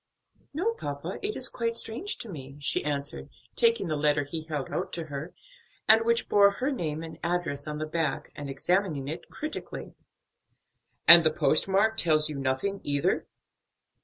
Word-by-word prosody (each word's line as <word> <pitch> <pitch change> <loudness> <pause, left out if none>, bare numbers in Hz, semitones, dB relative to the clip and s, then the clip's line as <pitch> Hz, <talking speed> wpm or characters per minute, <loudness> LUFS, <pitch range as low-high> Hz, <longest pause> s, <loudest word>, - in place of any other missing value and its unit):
"No, 365 +11 0
papa, 145 - -5
it 420 +1 -3
is 255 - +3
quite 230 -2 -2
strange 240 - -1
to 230 - -6
me," 140 -5 -9
she 145 - +3
answered, 145 -1 -3 0.3
taking 465 - +3
the 155 - -1
letter 150 0 +2
he 160 +3 -5
held 150 -4 -4
out 185 - -3
to 170 - -2
her, 150 +2 -6 0.6
and 225 +1 +6
which 235 0 +1
bore 200 -1 +6
her 260 +7 -1
name 160 - -3
and 160 -1 -9
address 170 -5 -1
on 150 0 -4
the 155 - -3
back, 155 -2 -2
and 145 -1 -6
examining 155 0 0
it 160 +4 -6
critically. 305 +1 -6 1.1
"And 170 0 +11
the 160 - +5
post 155 +2 +2
mark 210 +3 +2
tells 155 -2 +2
you 145 -2 -5
nothing 135 +10 -1
either?" 145 -1 0
165 Hz, 170 wpm, -28 LUFS, 145-210 Hz, 1.1 s, And